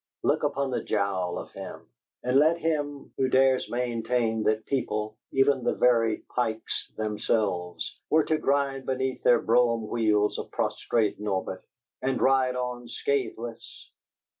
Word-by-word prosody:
Look -, -, +2 dB
upon 140 Hz, -1 st, 0 dB
the -, -, -1 dB
jowl 100 Hz, -4 st, -1 dB
of -, -, -7 dB
him, -, -, -9 dB, 0.4 s
and 125 Hz, +2 st, +3 dB
let 160 Hz, +3 st, +4 dB
him 145 Hz, -4 st, -2 dB
who 130 Hz, -1 st, +1 dB
dares 130 Hz, 0 st, +3 dB
maintain 120 Hz, -1 st, 0 dB
that 110 Hz, 0 st, +1 dB
people 110 Hz, -5 st, -2 dB, 0.2 s
even 135 Hz, -1 st, +3 dB
the -, -, +1 dB
very 115 Hz, -3 st, +3 dB
Pikes 110 Hz, -3 st, -2 dB
themselves 105 Hz, -4 st, -1 dB
were 155 Hz, 0 st, +4 dB
to 155 Hz, 0 st, 0 dB
grind 140 Hz, -1 st, 0 dB
beneath 130 Hz, 0 st, -1 dB
their 120 Hz, -1 st, +5 dB
brougham 115 Hz, -1 st, +3 dB
wheels 105 Hz, -3 st, +1 dB
a -, -, -2 dB
prostrate 110 Hz, -3 st, -1 dB
Norbert 95 Hz, -2 st, -3 dB, 0.4 s
and 130 Hz, 0 st, 0 dB
ride 130 Hz, -1 st, +3 dB
on 125 Hz, -1 st, -4 dB
scatheless! 120 Hz, -3 st, -4 dB
120 Hz, 140 wpm, -27 LUFS, 110-135 Hz, 0.4 s, their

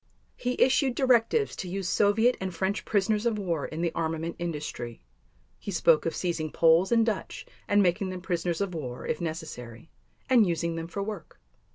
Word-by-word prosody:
He 250 Hz, 0 st, -3 dB
issued 265 Hz, -1 st, +3 dB
directives 260 Hz, -, +2 dB
to 185 Hz, -, -5 dB
use 190 Hz, 0 st, -3 dB
Soviet 220 Hz, +6 st, +3 dB
and 190 Hz, -1 st, -2 dB
French 190 Hz, +3 st, -1 dB
prisoners 210 Hz, +2 st, +1 dB
of 225 Hz, -2 st, 0 dB
war 170 Hz, -7 st, -2 dB
in 160 Hz, +1 st, -5 dB
the 170 Hz, -1 st, 0 dB
armament 165 Hz, +1 st, -2 dB
industry; 150 Hz, -, -5 dB, 0.6 s
he -, -, -7 dB
spoke 165 Hz, -4 st, +3 dB
of 165 Hz, -, -2 dB
seizing 170 Hz, -3 st, -2 dB
Poles 165 Hz, +4 st, +4 dB
and 230 Hz, -1 st, +4 dB
Dutch 220 Hz, -4 st, -3 dB, 0.2 s
and 205 Hz, 0 st, +4 dB
making 185 Hz, +2 st, +1 dB
them 185 Hz, -1 st, -6 dB
prisoners 175 Hz, -1 st, -2 dB
of 195 Hz, -2 st, -2 dB
war 130 Hz, -7 st, -5 dB
if 155 Hz, -, -2 dB
necessary, 155 Hz, -6 st, -6 dB, 0.4 s
and 240 Hz, -6 st, +5 dB
using 170 Hz, -1 st, -1 dB
them 165 Hz, 0 st, -4 dB
for 200 Hz, +4 st, -4 dB
work. 205 Hz, -4 st, -7 dB
180 Hz, 180 wpm, -28 LUFS, 165-210 Hz, 0.6 s, and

